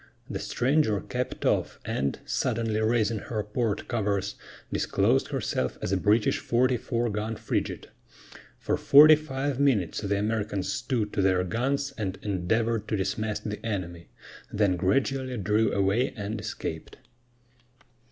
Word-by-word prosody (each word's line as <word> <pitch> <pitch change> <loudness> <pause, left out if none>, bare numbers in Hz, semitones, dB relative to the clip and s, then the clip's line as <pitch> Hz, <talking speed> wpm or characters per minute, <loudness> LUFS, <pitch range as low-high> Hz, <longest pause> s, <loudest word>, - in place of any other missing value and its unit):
The - - -4
stranger 125 -4 +1
kept - - -4
off, - - +1
and, 70 +1 -1
suddenly 110 -1 -1
raising 110 -1 +1
her 110 0 -3
port 105 0 -2
covers, 100 -4 -1 0.4
disclosed - - +2
herself 65 - -2
as - - -3
a - - +3
British 105 +3 +2
44 120 -1 0
gun 110 +2 -3
frigate. - - -3 0.7
For - - -1
forty 150 +2 +8
five 140 -3 -3
minutes 120 - +2
the 100 -1 0
Americans 105 -2 -1
stood 125 -6 -2
to 100 - +1
their 95 -1 +3
guns 135 +8 -1
and 95 -3 -2
endeavored 110 +3 0
to 110 - -1
dismast 105 +3 -2
the 105 0 -5
enemy, 90 -6 -4 0.4
then 100 -3 +2
gradually 130 +7 0
drew 105 +2 +2
away 100 +6 +1
and 105 +1 -4
escaped. 80 -5 -6
110 Hz, 135 wpm, -27 LUFS, 100-120 Hz, 0.7 s, forty